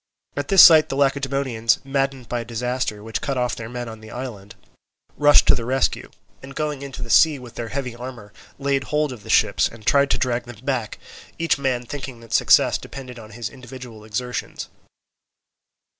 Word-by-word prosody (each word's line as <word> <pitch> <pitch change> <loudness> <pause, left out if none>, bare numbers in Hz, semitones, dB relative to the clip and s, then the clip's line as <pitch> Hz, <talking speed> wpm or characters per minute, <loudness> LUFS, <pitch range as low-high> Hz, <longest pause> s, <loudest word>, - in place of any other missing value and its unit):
At 145 0 -3
this 195 -2 +8
sight 160 -2 +8
the - - -3
Lacedaemonians, 135 -4 +1
maddened 135 -2 -2
by 120 - -2
a - - -4
disaster 120 -2 -3
which 110 0 -4
cut 140 -2 -2
off 125 -1 0
their 110 -1 -7
men 120 0 -5
on 110 -1 -9
the 110 0 -13
island, 110 -6 -8 0.6
rushed 145 0 +6
to - - +7
the 115 - -2
rescue, 130 +3 0 0.3
and 135 +1 -11
going 150 -3 -3
into 135 -2 -7
the 120 - -8
sea 155 -3 +6
with 125 -3 -11
their 120 - -5
heavy 125 -1 -4
armour, 120 -4 -9 0.2
laid 135 -1 0
hold 150 0 0
of 120 - -11
the - - -13
ships - - +3
and 115 -2 -14
tried 140 +4 +4
to - - +2
drag 120 -1 -1
them 120 0 -12
back, 130 -6 -2 0.4
each 165 -4 +1
man 130 -3 -1
thinking 130 -2 -7
that 115 - -10
success - - +4
depended 125 -3 -9
on 110 -1 -12
his 120 -3 -3
individual 130 -4 -11
exertions. 125 +3 -5
125 Hz, 190 wpm, -22 LUFS, 115-140 Hz, 0.6 s, this